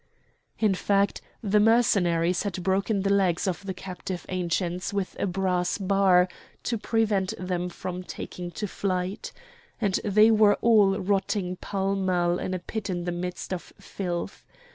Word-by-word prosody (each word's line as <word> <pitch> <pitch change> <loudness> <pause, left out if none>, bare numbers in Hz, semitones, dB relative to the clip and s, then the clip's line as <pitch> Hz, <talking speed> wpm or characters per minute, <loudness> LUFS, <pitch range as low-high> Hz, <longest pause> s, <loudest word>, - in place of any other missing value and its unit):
In 215 -3 +3
fact, 200 +1 +1 0.2
the 210 0 +3
Mercenaries 185 -6 +3
had 190 -3 -3
broken 195 +2 +1
the 200 0 +2
legs 185 -4 +2
of 185 +1 -2
the 195 -1 -4
captive 185 0 -6
Ancients 180 0 -1
with 200 -2 -2
a - - 0
brass 180 -1 0
bar 190 -2 +4 0.4
to 230 -3 -1
prevent 215 -3 0
them 180 -1 -2
from 180 +1 -5
taking 180 -1 -7
to 210 +4 -4
flight; 185 +1 -3 0.5
and 200 -4 +1
they 215 +2 +5
were 215 -2 +5
all 210 -4 +4
rotting 195 -1 0
pell 195 +1 -2
mell 180 -2 +1
in 185 - -2
a - - 0
pit 205 +3 -5
in 175 -2 -2
the 175 - -2
midst 180 +2 -4
of 180 - -7
filth. 175 -3 -5
190 Hz, 155 wpm, -26 LUFS, 180-200 Hz, 0.5 s, they